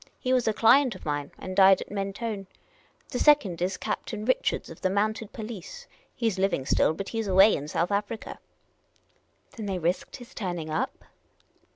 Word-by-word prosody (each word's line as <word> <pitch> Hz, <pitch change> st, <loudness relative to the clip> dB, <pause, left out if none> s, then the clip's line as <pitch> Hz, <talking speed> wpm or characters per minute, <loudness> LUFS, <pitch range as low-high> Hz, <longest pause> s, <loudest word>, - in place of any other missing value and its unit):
He 255 Hz, -1 st, 0 dB
was 250 Hz, -3 st, +2 dB
a -, -, +4 dB
client 240 Hz, +2 st, +4 dB
of -, -, -12 dB
mine, 145 Hz, -1 st, -2 dB
and 185 Hz, 0 st, -7 dB
died 190 Hz, -1 st, +7 dB
at -, -, -8 dB
Mentone. 200 Hz, 0 st, -4 dB, 0.6 s
The 250 Hz, -, -3 dB
second 225 Hz, -, +4 dB
is 185 Hz, +1 st, -1 dB
Captain 215 Hz, 0 st, -4 dB
Rich 255 Hz, -, +2 dB
ards, -, -, -6 dB
of 165 Hz, -, -12 dB
the 185 Hz, -, +1 dB
Mounted 215 Hz, +2 st, -1 dB
Police: 220 Hz, -, -8 dB, 0.3 s
he 230 Hz, -, 0 dB
's 195 Hz, -4 st, -1 dB
living 190 Hz, -9 st, 0 dB
still, 155 Hz, -, +2 dB
but 195 Hz, +2 st, -5 dB
he 225 Hz, -, -2 dB
's 215 Hz, -, -5 dB
away 195 Hz, +3 st, +6 dB
in 145 Hz, -, -5 dB
South 170 Hz, +5 st, -1 dB
Africa." 210 Hz, +2 st, -3 dB, 0.6 s
" -, -, -31 dB
Then 215 Hz, -2 st, -5 dB
they 190 Hz, -2 st, -1 dB
risked 175 Hz, +2 st, -2 dB
his 245 Hz, 0 st, -12 dB
turning 175 Hz, -6 st, -4 dB
up 155 Hz, -, -2 dB
200 Hz, 195 wpm, -27 LUFS, 185-225 Hz, 0.6 s, died